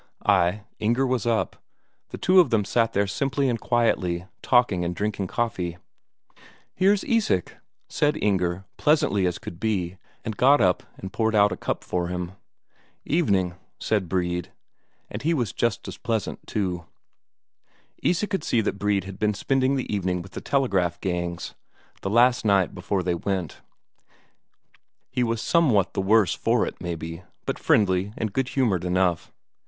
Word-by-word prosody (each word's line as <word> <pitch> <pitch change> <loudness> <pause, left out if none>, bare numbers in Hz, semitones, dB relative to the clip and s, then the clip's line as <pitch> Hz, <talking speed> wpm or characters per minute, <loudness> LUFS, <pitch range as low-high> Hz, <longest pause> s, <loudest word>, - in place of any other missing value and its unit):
Ay, 90 +5 +3 0.2
Inger 120 +5 +2
was 125 -2 0
up, 115 -2 0 0.5
the - - -7
two 185 +1 +4
of 175 - +5
them 110 -4 +2
sat 115 +2 +1
there 100 +1 +2
simply 135 +5 0
and 120 -3 0
quietly, 90 -7 +1 0.2
talking 120 -8 +3
and 85 +1 -2
drinking 100 -1 -2
coffee. 90 -7 -2 1.0
"Here's 200 +1 +3
Isak," 215 - 0 0.3
said 150 +1 +1
Inger 95 -2 0
pleasantly 150 - +2
as 90 -1 -2
could 85 - -9
be, 95 -4 -1 0.3
and 110 - -3
got 140 +6 +5
up 90 -1 +3 0.2
and 95 0 -8
poured 110 -1 +1
out 105 -1 +5
a - - -2
cup - - -3
for 90 -1 -2
him. 90 0 -4 0.7
"Evening," 100 - +1 0.3
said 105 -6 0
Brede, 90 -1 -1 0.6
and - - -6
was 120 - -1
just 115 -4 -1
as - - -8
pleasant 110 -3 -3
too. 90 -4 -2 1.1
Isak 190 +5 +1
could 195 - -1
see 115 - +2
that 100 -2 -2
Brede 100 -1 +1
had 95 +1 -9
been 105 -1 +1
spending 135 +5 +1
the 130 -5 -3
evening 90 -3 -1
with 95 - -13
the - - -7
telegraph 100 -11 +1
gangs, 85 -2 -3 0.5
the 95 - -2
last 120 +3 +4
night 100 -4 +3
before 95 -2 -2
they 90 0 0
went; 90 -2 -3 1.5
he 125 - -1
was 115 -2 -1
somewhat 130 - +3
the - - 0
worse 105 -1 +4
for - - +1
it, - - -7
maybe, 85 -1 -5 0.2
but - - -2
friendly 95 -1 +2
and 110 -3 -2
good 130 +1 0
humoured 115 -11 +1
enough. 90 -1 0
100 Hz, 160 wpm, -25 LUFS, 90-120 Hz, 1.5 s, of